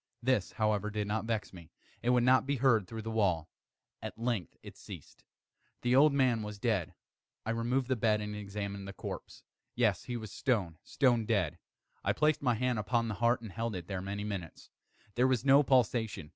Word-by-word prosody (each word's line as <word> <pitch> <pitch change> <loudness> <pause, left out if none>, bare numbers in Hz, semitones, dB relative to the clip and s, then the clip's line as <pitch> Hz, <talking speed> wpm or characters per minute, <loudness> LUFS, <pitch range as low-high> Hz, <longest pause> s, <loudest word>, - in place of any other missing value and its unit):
This, 125 -7 +1
however, 105 -1 0
did 105 0 -2
not 110 +2 -2
vex 110 -5 -2
me; 85 -3 -12 0.3
it 120 - 0
would 125 -1 +4
not 130 +1 +4
be 140 - +1
heard 120 -7 +3
through 110 -1 -6
the 115 - -4
wall. 90 -7 +1 0.5
At - - -6
length 115 -7 -2
it - - -10
ceased. - - -11 0.6
The 125 +1 +3
old 145 +3 +7
man 130 -5 +2
was 105 -1 -6
dead. 100 -6 -1 0.5
I 115 - -1
removed 120 +3 0
the 130 - +1
bed 110 -2 +2
and 105 0 -4
examined 100 -1 -5
the 100 - -7
corpse. - - -8 0.3
Yes, - - +1
he 120 - -3
was 110 -3 -7
stone, 95 - -1
stone 120 -5 +2
dead. 100 -9 0 0.4
I - - +2
placed 150 -1 +2
my 125 -4 +2
hand 125 0 0
upon 115 +2 0
the - - -2
heart 120 0 +3
and 110 -4 -8
held 115 0 -3
it 90 -2 -5
there 95 0 -4
many 100 +2 -4
minutes. 95 -6 -6 0.4
There 125 +4 +3
was 130 -1 +1
no 140 +1 +7
pulsation. 115 - +1
110 Hz, 200 wpm, -32 LUFS, 100-125 Hz, 0.6 s, old